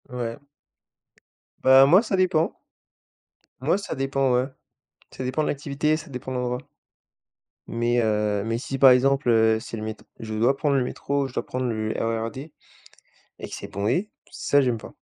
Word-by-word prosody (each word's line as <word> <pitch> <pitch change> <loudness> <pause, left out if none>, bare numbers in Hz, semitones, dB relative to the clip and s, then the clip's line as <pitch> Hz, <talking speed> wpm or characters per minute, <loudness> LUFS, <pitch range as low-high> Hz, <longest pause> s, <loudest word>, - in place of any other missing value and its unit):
Ouais. 120 0 -4 1.2
Bah 130 +1 +8
moi 180 +8 +6
ça 220 -4 -2
dépend. 180 -4 +2 1.1
Moi 155 +8 +2
ça 200 - -5
dépend, 135 -1 0
ouais. 125 +1 +2 0.6
Ça - - -7
dépend 130 +5 0
de - - -1
l'activité, 145 +2 0
ça 160 +1 -10
dépend 130 0 -7
de 130 - -2
l'endroit. 125 0 -2 1.1
Mais 120 +1 0
heu, 105 -2 0
mais 115 0 -1
si 135 +2 -4
par 135 0 +8
exemple, 135 +1 +3
heu, 110 -1 +4
c'est 115 - -7
le 105 - -5
mét 110 0 -4 0.2
je 110 -1 -6
dois 120 +5 +2
prendre 145 -1 +1
le 130 - +2
métro, 140 +2 -2
je 130 - -13
dois - - -3
prendre 130 0 -3
le 110 -2 -2
RER 115 0 -1
D 140 +6 -9 0.9
et - - -7
que - - -11
c'est - - -7
bondé, 120 - -1 0.2
ça 145 - +2
j'aime 125 -3 +1
pas. - - -11
130 Hz, 180 wpm, -24 LUFS, 115-140 Hz, 1.2 s, Bah